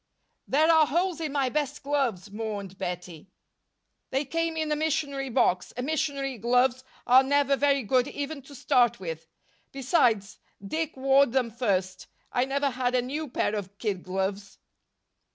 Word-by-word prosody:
"There 310 +4 +4
are 320 -2 +5
holes 345 +1 0
in 310 -3 -2
my 275 -2 +1
best 290 +1 -2
gloves," 255 -10 -1
mourned 205 -3 -5
Bettie. 180 -1 -6 0.8
"They 270 +3 -1
came 330 +3 -2
in 310 -1 -1
a - - +2
missionary 285 -3 -1
box, 180 -6 +1
and 250 - -4
missionary 280 -4 -2
gloves 250 +3 +2 0.2
are 255 +2 +7
never 280 0 +2
very 280 -1 +2
good 250 +3 +2
even 285 +1 -5
to 285 - -11
start 240 -2 +2
with. 165 -3 -6 0.4
Besides, 245 - +1 0.3
Dick 315 +6 -3
wore 270 +1 +4
them 245 -1 0
first 190 -6 -1 0.2
I 245 - +1
never 280 +1 0
had 250 0 -1
a 250 - +3
new 295 +5 -4
pair 215 - -1
of 200 -1 -5
kid 200 -5 -2
gloves." 195 +2 -3
260 Hz, 155 wpm, -27 LUFS, 210-285 Hz, 0.8 s, are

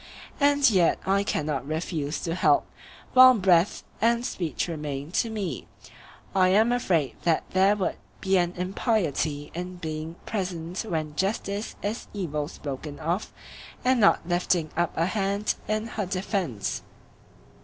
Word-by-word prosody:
And 285 -1 +5
yet 185 -7 +4
I 195 +1 +3
cannot 145 -7 -2
refuse 155 -1 -2
to 165 - -2
help, 155 -5 +3 0.5
while 255 0 +9
breath 185 -3 +3 0.2
and 235 +2 +2
speech 170 -7 -2
remain 150 -2 -5
to 230 - +1
me; 195 - -4 0.7
I 185 -1 +4
am 215 +5 +4
afraid 175 - +1
that 165 -2 +2
there 190 +2 +4
would 195 -3 -2 0.2
be 190 0 +1
an 175 0 0
impiety 175 - -1
in 180 +2 -5
being 160 -1 -5
present 180 -3 -3
when 155 -2 -2
justice 200 +3 -2
is 210 +4 -3
evil 150 -7 -2
spoken 145 -1 -6
of 170 +6 -2 0.5
and 255 -1 +4
not 200 -5 +4
lifting 175 -2 +1
up 170 0 +1
a 165 - +3
hand 200 +1 0
in 215 +1 0
her 215 -4 -3
defence. 185 - -2
180 Hz, 140 wpm, -26 LUFS, 160-205 Hz, 0.7 s, while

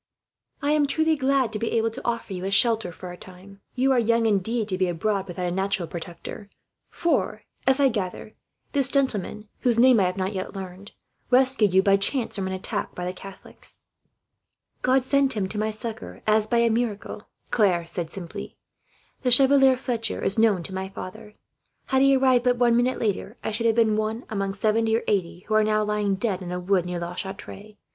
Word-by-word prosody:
"I 290 - +2
am 300 -1 +3
truly 315 +2 +2
glad 265 -4 +1
to 210 - -2
be 225 - -2
able 225 0 +1
to 255 - -8
offer 235 -4 -3
you 180 -1 -5
a - - -1
shelter, 220 -1 +3
for 180 +2 -9
a - - -8
time. 190 +2 -14
You 265 +2 +2
are 255 - +4
young, 230 0 +2
indeed, 220 +2 +1
to 185 - 0
be 185 - +2
abroad 195 +3 -1
without 180 0 -4
a 175 - -1
natural 190 -1 -1
protector; 175 +5 -8 0.4
for 280 -10 -1 0.2
as 265 +1 +4
I 275 -1 +5
gather 210 -1 -4 0.4
this 275 -3 +2
gentleman, 220 -6 -1
whose 240 -2 +2
name 250 -1 +6
I 190 - +3
have 180 +1 -2
not 190 +2 -2
yet 190 +1 -5
learned, 190 +1 -8 0.4
rescued 255 -5 +4
you 190 - +5
by 195 0 +4
chance 230 +5 -1
from 195 -2 -2
an 190 - -3
attack 185 - -4
by 180 - -4
the 180 - -3
Catholics." 195 +1 -9 1.0
"God 260 0 +2
sent 275 0 +2
him 205 -4 -1
to 210 - -3
my 215 +1 0
succour, 220 +1 -7
as 215 0 +2
by 235 - +1
a 235 -1 +3
miracle," 215 -3 -3 0.2
Claire 185 -7 +2
said 170 -1 -3
simply. 175 -1 -8 0.7
"The 255 - +1
Chevalier 270 +1 +6
Fletcher 235 -3 -2
is 200 - +2
known 210 -6 +3
to 190 - -6
my 190 0 -4
father. 195 +2 -9 0.5
Had 265 -1 +3
he 275 0 +5
arrived 260 -2 +3
but 245 -1 +3
one 240 -1 +3
minute 245 +2 +1
later, 210 +1 -2
I - - -2
should 225 +1 +1
be 230 - +5
one 215 +2 -1
among 195 -2 -2
seventy 220 +2 +1
or - - -4
eighty 175 -3 -1
who 215 - -5
are 215 0 +4
now 215 0 +1
lying 210 -1 0
dead 195 -2 -2
in 175 -1 -6
a 180 - -3
wood, 180 -1 +1
near 180 0 -3
La 170 +1 -5
Chatre. 200 +2 -8
215 Hz, 205 wpm, -24 LUFS, 190-240 Hz, 1.0 s, name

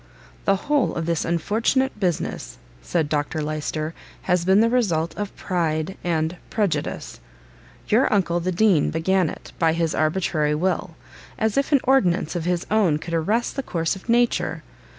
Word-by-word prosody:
"The 195 - +4
whole 290 +5 0
of 165 - -2
this 170 -1 0
unfortunate 220 - 0
business," 180 -5 -2 0.2
said - - 0
Dr 150 +1 -1
Lyster, 155 +1 -3 0.3
"has 180 -1 +1
been 190 +2 +5
the 225 - +5
result 185 -10 +1
of 205 -1 -5
PRIDE 165 -1 -1
and 165 0 -1
PREJUDICE. 205 -6 -2 0.7
Your 235 +5 +3
uncle, 175 -4 +2
the 180 +2 -1
Dean, 185 -4 +3
began 180 +1 +1
it, - - -10
by 165 -2 +3
his 165 -1 0
arbitrary 155 -2 +1
will, 180 +1 -1 0.4
as 220 -1 0
if 275 +2 +1
an 280 -3 +4
ordinance 180 - +2
of 170 -2 -2
his 180 -1 0
own 200 -8 +3
could 170 +2 -7
arrest 205 +9 0
the 275 - -1
course 165 -7 -1
of 190 +4 -13
nature! 240 +1 +1
175 Hz, 160 wpm, -23 LUFS, 160-210 Hz, 0.7 s, been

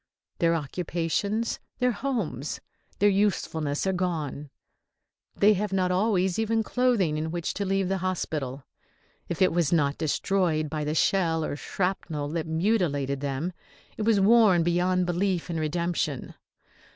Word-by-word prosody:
Their 170 0 +3
occupations, 175 +8 -2 0.2
their 250 -1 +2
homes, 205 - -3 0.4
their 205 - +4
usefulness 170 -7 0
are 190 - +1
gone. 160 -6 -3 0.9
They 210 +1 +5
have 205 0 -2
not 185 -1 +1
always 190 -1 +1
even 225 0 +1
clothing 220 -12 +1
in 160 +1 -2
which 170 0 -3
to 200 - -2
leave 195 0 +1
the 190 +1 -1
hospital. 150 -7 -3 0.6
If 170 +2 +1
it 185 - +4
was 170 -4 +1
not 145 -4 +2
destroyed 160 -1 0
by 155 -1 -2
the 150 +1 -1
shell 165 -4 +2
or - - -3
shrapnel 160 -3 -2
that 160 +1 -3
mutilated 160 -6 0
them 145 +5 -2 0.4
it - - -5
was 215 -1 +3
worn 200 -4 +5
beyond 180 +2 +2
belief 175 0 -1
and 165 - -2
redemption. 155 -3 -2
175 Hz, 140 wpm, -27 LUFS, 155-195 Hz, 0.9 s, They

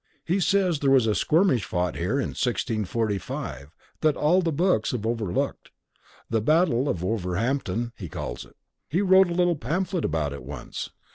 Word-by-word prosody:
He 180 +4 +1
says 185 -4 +2
there 140 - +2
was 135 -4 +5
a 110 - +2
skirmish 155 - +2
fought 90 -1 -1
here 90 +8 -1
in 135 - -1
1645 105 - -2 0.3
that 155 -2 +3
all 175 +5 +3
the 170 -2 0
books 160 - +1
have 115 -3 -3
overlooked. 110 -6 -2 0.6
The 115 -1 0
Battle 145 - +2
of 90 -2 -2
Wolverhampton, 115 +4 -1
he 90 -7 -8
calls - - -5
it. - - -19 0.3
He 175 +8 +1
wrote 190 -1 +6
a 170 - -2
little 175 -1 +3
pamphlet 175 - -2
about 75 -3 -1
it 70 - -7
once." 70 0 -6
120 Hz, 165 wpm, -25 LUFS, -, 0.6 s, wrote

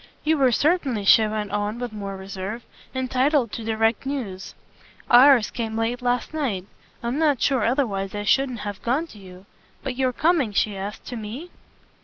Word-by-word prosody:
"You 315 0 +2
were 260 -2 +4
certainly," 275 - +1
she 220 +2 +6
went 210 -2 -3
on 205 +2 -2
with 245 -2 -5
more 200 -2 -5
reserve, 195 +4 -6 0.3
"entitled 260 -1 +1
to 230 - -5
direct 225 0 +1
news. 240 -10 -5 0.6
Ours 250 -1 +7
came 225 -2 -4
late 235 +2 -1
last 245 +3 -1
night: 240 -12 -2 0.4
I'm 240 +5 -1
not 295 -5 +2
sure 265 -5 +2
otherwise 210 -7 0
I 205 - -3
shouldn't 255 +1 +1
have 205 -2 -6
gone 265 +8 0
to 220 -10 -14
you. 185 0 -13 0.4
But 265 -2 -3
you're 260 -1 +1
coming," 295 -5 +1
she 205 0 +1
asked, 195 +2 -6
"to 245 - -6
ME?" 230 +11 -7
235 Hz, 175 wpm, -23 LUFS, 205-265 Hz, 0.6 s, Ours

